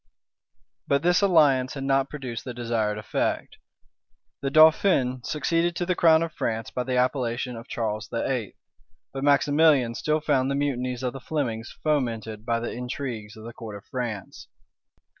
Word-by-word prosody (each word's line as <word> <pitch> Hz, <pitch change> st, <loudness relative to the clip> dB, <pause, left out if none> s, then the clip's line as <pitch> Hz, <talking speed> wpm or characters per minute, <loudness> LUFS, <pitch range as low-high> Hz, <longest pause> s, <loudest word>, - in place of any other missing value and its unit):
But 140 Hz, +2 st, +2 dB
this 175 Hz, +2 st, +3 dB
alliance 145 Hz, -9 st, +4 dB
had 135 Hz, -, -4 dB
not 135 Hz, 0 st, +1 dB
produced 130 Hz, -6 st, -6 dB
the 125 Hz, -2 st, -7 dB
desired 115 Hz, -3 st, -1 dB
effect. 105 Hz, -, -2 dB, 0.8 s
The 135 Hz, -, -1 dB
dauphin 155 Hz, -4 st, +4 dB
succeeded 165 Hz, +5 st, 0 dB
to 175 Hz, -, -1 dB
the 180 Hz, -, +1 dB
crown 165 Hz, -2 st, +5 dB
of 165 Hz, -1 st, -5 dB
France 115 Hz, -5 st, -3 dB
by 125 Hz, -, -3 dB
the 130 Hz, 0 st, -1 dB
appellation 125 Hz, -1 st, 0 dB
of 115 Hz, +1 st, -9 dB
Charles 110 Hz, -2 st, -3 dB
VIII.; 115 Hz, -1 st, -2 dB, 0.6 s
but 135 Hz, 0 st, -4 dB
Maximilian 145 Hz, -3 st, +4 dB
still 155 Hz, +5 st, 0 dB
found 140 Hz, -4 st, +1 dB
the 140 Hz, -, 0 dB
mutinies 130 Hz, -3 st, -2 dB
of 125 Hz, -, -1 dB
the 135 Hz, -, -7 dB
Flemings 125 Hz, -7 st, -3 dB
fomented 115 Hz, -7 st, -1 dB
by 115 Hz, -1 st, +1 dB
the 120 Hz, -, -4 dB
intrigues 120 Hz, -4 st, -5 dB
of 110 Hz, -, -11 dB
the 115 Hz, +1 st, -8 dB
court 110 Hz, -3 st, -8 dB
of 100 Hz, -, -11 dB
France. 120 Hz, -7 st, -5 dB
130 Hz, 160 wpm, -25 LUFS, 115-145 Hz, 0.8 s, crown